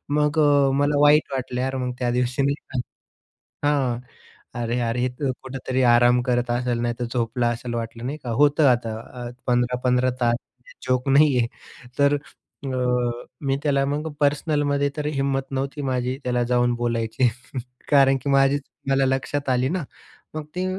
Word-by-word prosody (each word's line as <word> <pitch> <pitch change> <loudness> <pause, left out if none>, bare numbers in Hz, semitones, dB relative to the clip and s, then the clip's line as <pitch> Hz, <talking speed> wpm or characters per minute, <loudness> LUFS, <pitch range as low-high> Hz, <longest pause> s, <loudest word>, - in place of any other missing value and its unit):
मग 150 +1 +2
अ, 145 -2 +4
मला 145 0 +2
वाईट 150 0 +5
वाटलं 125 -1 -3
यार 130 +1 -1
मग 125 -1 -2
त्या 125 -1 0
दिवशी 125 +2 0
नाही 140 +1 +1
का. 130 - -3 0.9
हां, 135 -5 +1 0.6
अरे-अरे 120 0 -1
हे 125 - +2
तर 140 -3 0
कुठेतरी 130 0 -3
आराम 120 +1 +5
करत 125 -1 0
असेल 120 -1 0
नाहीतर 120 0 -2
झोपला 120 0 0
असेल 120 +1 -4
वाटलं, 115 0 -5
नाही 145 +3 -4
का. 125 - -5
होतं 145 +4 +4
आता 115 -2 -1 0.3
अ, 120 - -5 0.2
15-15 125 +1 +2
तास 120 -1 +3 0.5
जोक 130 +1 +1
नाही 140 -1 +5
आहे 120 - +2 0.5
तर 140 0 +4
अ, 145 -1 -11 0.7
मी 135 -1 0
त्याला 140 -2 +2
मग 150 +3 -2
पर्सनलमध्ये 145 -1 +1
तर 150 - -2
हिंमत 135 -2 -1
नव्हती 135 +2 -3
माझी 130 -1 -1
त्याला 125 -1 +1
जाऊन 120 0 +3
बोलायची 120 +1 0 0.6
कारण 135 -2 +5
की 140 - -2
माझीच 140 +1 +3
चूक - - -39 0.2
मला 135 0 +3
लक्षात 135 +1 -1
आली 130 +1 +2
ना, 180 +1 -2 0.5
मग 155 -1 -4
ते 180 +1 -1
130 Hz, 160 wpm, -23 LUFS, 120-140 Hz, 0.9 s, वाईट